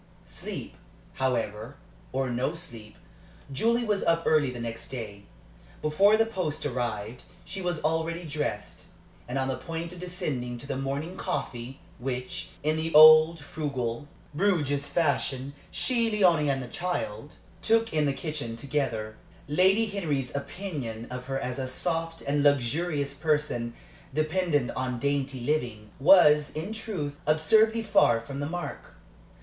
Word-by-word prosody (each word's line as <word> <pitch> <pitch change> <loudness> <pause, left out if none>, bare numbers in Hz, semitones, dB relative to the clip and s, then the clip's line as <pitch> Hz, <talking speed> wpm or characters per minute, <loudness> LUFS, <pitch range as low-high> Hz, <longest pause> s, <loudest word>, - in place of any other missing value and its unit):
Sleep, - - -7 0.4
however, 120 -1 -2 0.4
or 130 -1 -1
no 125 +7 -1
sleep, 115 -11 -9 0.6
Julie 230 - +2
was 210 -3 0
up 165 0 +2
early 150 -4 +3
next 115 -2 -6
day. 105 -6 -7 0.5
Before 195 +8 +4
the 225 - +4
post 185 -10 -3
arrived 120 -3 -3 0.2
she 190 +3 -5
was 175 -3 -2
already 160 +2 0
dressed, 145 -9 -4 0.4
and 125 +2 -3
on 130 0 0
the 130 - -1
point 165 +1 -5
of 180 - -10
descending 140 -9 -3
to 120 - -9
the 140 -1 -3
morning 140 +7 -3
coffee, 135 -8 -4 0.2
which, 125 0 -4
in 155 +1 +1
the 160 +1 -2
old, 155 +2 +9
frugal, 140 -4 -3 0.3
Bruges 150 -5 +1
fashion, 140 -4 0 0.2
she 235 -3 +1
and 220 - -1
Léonie 165 -7 +4
and 135 -1 -2
the - - -7
child 145 -4 -4 0.3
took 225 0 +2
in 155 -2 +2
the - - +2
kitchen 145 -6 -4
together. 115 -5 -2 0.3
Lady 190 +9 +4
Henry's 155 - -2
opinion 140 - -5
of 125 0 -5
her 135 0 -2
as 125 -1 -4
a 130 - -2
soft 165 +4 -2
and 145 +1 +1
luxurious 145 +2 +1
person 145 -6 -1 0.4
dependent 155 -3 +1
on 130 -1 -2
dainty 140 0 -1
living 120 -6 -2
was, 150 -2 +7
in 165 +8 -4
truth, 175 -10 -4
absurdly 220 +9 +4
far 200 - +4
from 135 +4 -7
the 145 +1 -2
mark. 175 +1 -6
145 Hz, 145 wpm, -28 LUFS, 125-170 Hz, 0.6 s, old